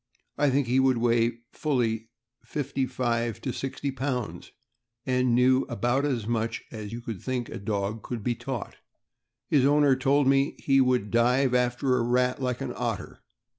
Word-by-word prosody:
I 145 0 +2
think 135 +1 +2
he 125 +2 +2
would 130 -2 +3
weigh 115 0 +1
fully 115 -7 -1 0.3
fifty 135 -2 -2
five 120 -3 -1
to 130 - -3
sixty 135 +1 -3
pounds, 130 -3 -4 0.5
and 125 -2 +2
knew 130 +1 +4
about 120 +3 0
as 125 -7 -1
much 115 0 -2
as 105 -2 -7
you 120 +1 -6
would 110 -5 -5
think 125 -3 -3
a - - -6
dog 100 +1 -2
could 120 -4 -5
be 120 - +1
taught. 125 0 -6 0.7
His 145 -4 +3
owner 145 -1 +4
told 135 +2 +2
me 135 +1 +3
he 135 -1 +3
would 125 -5 +1
dive 125 +3 +3
after 125 +1 +2
a - - +1
rat 125 +2 +1
like 125 -2 -2
an - - -3
otter. - - -4
125 Hz, 170 wpm, -27 LUFS, 115-135 Hz, 0.7 s, knew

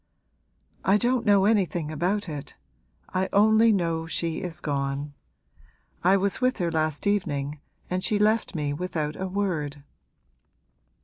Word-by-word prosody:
'I 195 +2 +4
don't 245 +2 +1
know 200 -1 +5
anything 175 -7 +1
about 185 +7 -1
it. 145 -3 -7 0.6
I 185 +1 0
only 220 +2 +5
know 165 -4 0
she 165 -1 -2
is 175 -4 -4
gone. 140 0 -2 0.9
I 190 +3 +5
was 200 +4 -1
with 255 +1 +2
her 175 -4 -1
last 155 0 -1
evening 150 -8 -1 0.3
and 185 0 -2
she 210 - +2
left 215 -1 +1
me 145 -2 -1
without 155 -2 -3
a 190 - -3
word.' 165 -8 -2
180 Hz, 135 wpm, -26 LUFS, 150-205 Hz, 0.9 s, know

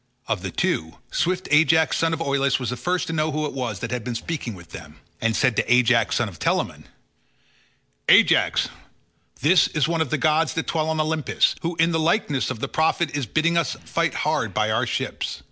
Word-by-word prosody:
Of - - -1
the - - -4
two, 80 +1 -1 0.2
swift 180 +2 -1
Ajax 160 +1 +4
son 165 0 +1
of 165 0 -3
Oileus 140 -2 +1
was 125 -2 -3
the - - -2
first 175 +9 -1
to 165 - -4
know 155 -1 0
who 155 +1 -2
it 150 - -4
was 130 -3 -4
that 115 - -4
had 125 -2 -3
been 120 0 -4
speaking 125 -4 -4
with 85 -2 -14
them, - - -10 0.3
and 115 0 +1
said 130 -4 +2
to - - 0
Ajax 125 -2 +3
son 120 - +1
of 90 -6 -11
Telamon, - - -1 1.2
"Ajax, - - +4 0.7
this 170 +5 +5
is 150 -2 0
one 165 -1 0
of 160 - -1
the 155 - 0
gods 155 +1 +1
that 160 - -1
dwell 160 -1 -1
on 160 0 -1
Olympus, 155 -1 +1
who 170 +1 -3
in 165 +1 +2
the 165 - 0
likeness 160 - 0
of 130 -4 -5
the - - -1
prophet 160 -1 0
is 140 -5 -2
bidding 170 +7 +1
us 165 - -1
fight - - -1
hard - - -1
by - - +1
our - - 0
ships. - - -3
155 Hz, 215 wpm, -23 LUFS, 125-165 Hz, 1.2 s, this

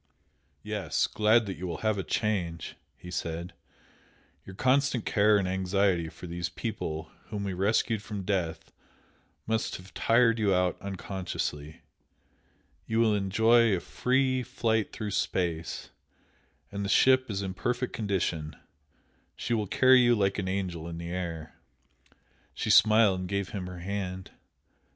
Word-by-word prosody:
"Yes! 105 -6 -1
glad 110 +2 +3
that 95 -4 -5
you 90 +2 -5
will 85 - -5
have 110 -2 +2
a - - -2
change" 85 -2 -2 0.2
he 90 - -10
said 85 +1 -4 0.9
"Your 95 - -9
constant 130 +1 +2
care 105 +1 +4
and 100 -2 0
anxiety 95 -2 +1
for 90 - -11
these 85 0 -3
people 80 -6 -5
whom 105 -1 -5
we 100 -1 -2
rescued 105 +3 +1
from 105 -2 -6
death 90 -4 -2 0.7
must 110 0 -1
have 95 +1 -11
tired 115 0 +3
you 100 -3 +3
out 90 -1 0
unconsciously. 90 -6 -5 1.1
You 110 0 0
will 115 -2 +4
enjoy 110 +2 +4
a - - -2
free 130 +7 +1
flight 110 -2 -1
through 105 -2 -5
space, 85 -4 -2 0.8
and 100 0 -4
the 100 - -3
ship 130 +3 +4
is 100 -1 -2
in 95 -1 -3
perfect 125 +5 -2
condition; 90 -7 -2 0.8
she 120 - -2
will 105 -3 0
carry 130 +5 +6
you 120 -1 +4
like 100 -1 +1
an 95 - -2
angel 90 -4 -3
in 85 -1 -6
the 85 0 -6
air!" 85 -4 -5 1.0
She - - -1
smiled 110 -3 +6
and 90 -1 -5
gave 100 -1 -1
him 95 -3 -5
her 90 -1 -8
hand. 95 -1 -4
100 Hz, 145 wpm, -28 LUFS, 90-110 Hz, 1.1 s, carry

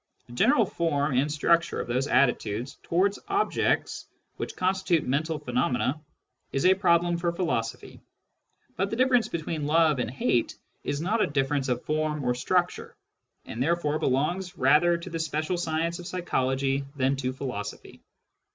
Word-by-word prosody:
The 120 - -13
general 230 - +4
form 150 -5 -1
and 140 +4 +2
structure 170 +3 +2
of - - -4
those 125 +3 0
attitudes 125 -3 +1
towards 195 +4 +1
objects 400 +1 0 0.3
which - - -5
constitute 185 -3 +1
mental 150 +4 -1
pheno 125 -2 0
mena 125 +4 -1 0.5
is 135 - -1
a 185 - +7
problem 175 -2 +2
for 170 0 0
philosophy; 165 -10 -3 0.7
but 195 +2 -1
the 225 - -2
diffisrence 250 -1 +3
between 160 -2 -3
love 155 -2 +3
and 125 - -1
hate 120 -1 0 0.3
is 145 +1 -2
not 215 +6 0
a - - +3
difference 140 -1 0
of 125 -1 -2
form 155 -1 -1
or 125 -1 +1
structxire, 175 +8 -1 0.5
and 115 - -6
therefore 155 0 +1
belongs 175 +8 -1
rather 150 +6 +4
to 170 +2 -8
the 165 - -3
special 155 +2 -1
science 170 0 -1
of 175 - -8
psychology 135 -6 -1
than 135 0 +1
to 130 -1 -2
philosophy. 125 -6 -6
155 Hz, 155 wpm, -27 LUFS, 135-175 Hz, 0.7 s, a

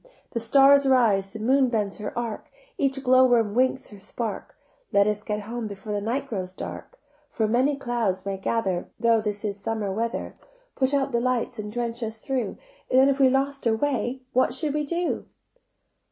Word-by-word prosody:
The 235 - -2
stars 275 +4 +5
rise, 220 -7 +3
the 195 - -9
moon 260 +4 +3
bends 210 -4 -1
her 210 - -4
arc, 235 -3 -4 0.3
Each 270 - 0
glowworm 250 -4 +4
winks 255 +2 +1
her 205 - -12
spark, 215 +2 -5 0.3
Let 200 0 +4
us 210 0 0
get 210 0 -3
home 230 +2 -5
before 205 +1 -6
the 205 - -1
night 255 +6 -2
grows 185 -6 -4
dark: - - -8 0.3
For 220 - 0 0.3
clouds 235 -8 -1
may 195 -1 -2
gather 190 -3 -1
Though 230 -1 +3
this 210 0 -3
is 200 -1 -3
summer 210 -1 -2
weather, 230 +4 -3 0.4
Put 260 0 +1
out 275 0 0
the 235 -1 +1
lights 250 -1 -1
and 210 0 -5
drench 235 +1 -3
us 225 -1 -4
through; 250 -2 -3 0.3
Then 265 +2 +5
if 275 0 0
we 265 -1 +6
lost 275 0 0
our 225 - +3
way 260 0 -1
what 255 0 +2
should 295 0 -1
we 300 0 -1
do?" 340 +3 -2
235 Hz, 180 wpm, -25 LUFS, 210-265 Hz, 0.4 s, we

